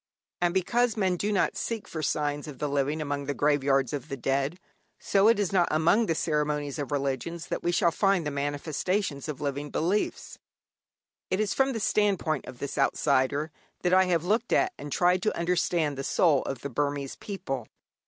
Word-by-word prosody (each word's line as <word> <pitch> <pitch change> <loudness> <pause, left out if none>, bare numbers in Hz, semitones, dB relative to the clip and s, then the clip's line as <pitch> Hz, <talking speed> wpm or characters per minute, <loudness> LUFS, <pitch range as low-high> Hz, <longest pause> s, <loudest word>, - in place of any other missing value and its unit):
And 175 -1 +3
because 230 +6 +1
men 190 -3 +2
do 205 +4 -1
not 200 - +1
seek 230 -2 -3
for 160 - -5
signs 145 0 -1
of 145 -3 -8
the 150 - -2
living 145 +2 0
among 145 -1 -3
the 145 - -2
graveyards 140 -3 +2
of 140 -3 -5
the 135 - -4
dead, 135 +6 -1 0.4
so 200 +1 +3
it 230 -1 +5
is 205 -2 -1
not 175 -3 +4
among 170 +9 +3
the 165 - +1
ceremonies 150 -2 -1
of 145 0 -4
religions 145 +4 -2
that - - -2
we 175 - 0
shall 170 -1 +3
find 195 -2 +2
the 150 - -1
manifestations 145 +3 -2
of 150 - -5
living 145 0 -3
beliefs. 185 +9 -1 0.9
It 185 - 0
is 215 -2 +1
from 270 0 +2
the 225 - -2
standpoint 195 - +1
of 125 - -9
this 140 +2 -4
outsider 140 +2 +1 0.3
that 180 0 +2
I 190 0 +6
have 175 -2 +1
looked 225 +5 0
at 370 0 +3
and 145 - -8
tried 180 +3 +3
to 215 - 0
understand 170 -4 0
the - - -2
soul 150 -1 +3
of 135 -3 -4
the 140 - -4
Burmese 140 +1 -2
people. 135 - -5
155 Hz, 195 wpm, -27 LUFS, 140-185 Hz, 0.9 s, I